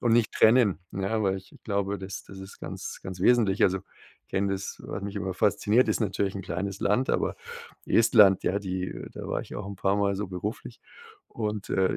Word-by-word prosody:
und 120 -2 +2
nicht 115 -2 +3
trennen, 110 -7 +4
ne? 100 +3 -1
Weil 95 -1 +1
ich 95 - -17
glaube, 100 -1 -1
das 95 0 -7
das 95 -1 -11
ist 95 +1 -11
ganz - - -6
ganz 95 -1 -7
wesentlich. 105 -2 +4
Also, 95 0 +4 0.4
ich - - -53
kenne 100 0 0
das 95 0 -5
was 100 - -5
mich 100 +1 -5
immer 95 -2 -2
fasziniert, 105 +5 +3
ist - - +1
natürlich 100 -2 0
'n 95 - -5
kleines 95 +3 -3
Land, 125 +6 +2
aber - - 0 0.5
Estland, 105 -4 +6
ja, 100 - +1
die 95 -2 -3 0.2
da - - -7
war - - -1
ich - - -10
auch 105 - -5
'n 100 0 -7
paar 95 +2 +1
Mal 100 -1 +1
so 105 +1 -3
beruflich 100 +5 -5 0.5
und, 105 -2 -4
äh, 95 -1 +2
100 Hz, 205 wpm, -27 LUFS, 95-105 Hz, 0.5 s, Estland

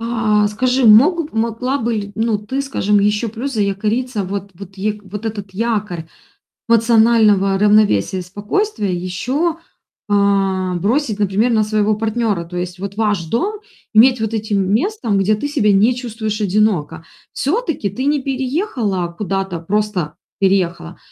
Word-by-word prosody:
А, 220 -3 +1
скажи, 250 +5 0
мог 295 - +5
могла 230 +4 -1
бы 235 -2 -1
ли, 205 -1 -4
ну, 220 -1 0
ты, 220 +7 -4
скажем, 210 -7 +1
еще 210 +3 +1
плюс 240 +6 -5
заякориться, 210 +2 -1
вот 200 +1 -5
вот 195 +2 -12
е 210 +2 -2
вот 205 +2 -8
этот 205 -3 -5
якорь 210 -6 -2 0.6
эмоционального 220 -4 +4
равновесия 205 - +3
и - - -4
спокойствия 205 - -2
еще, 255 - -2 0.5
а, 195 -2 +1
бросить, 215 - 0
например, 205 +4 +1
на 220 -1 +3
своего 215 0 +1
партнера. 220 -4 -1
То 175 +2 -9
есть 180 +1 -5
вот 200 0 -6
ваш 205 -6 0
дом 395 - -2 0.3
иметь 245 +3 +6
вот 220 0 -2
этим 205 -3 -1
местом, 250 - 0
где 210 +2 +2
ты 250 - -3
себя 255 -9 +2
не 210 +6 +4
чувствуешь 225 -3 -4
одиноко. 200 -6 0 0.3
Всё-таки 320 - -1
ты 240 +7 -5
не 290 0 +2
переехала 260 - -2
куда-то: 195 -3 -3
просто 190 -3 -2 0.3
переехала. 180 -3 0
210 Hz, 145 wpm, -18 LUFS, 195-235 Hz, 0.6 s, иметь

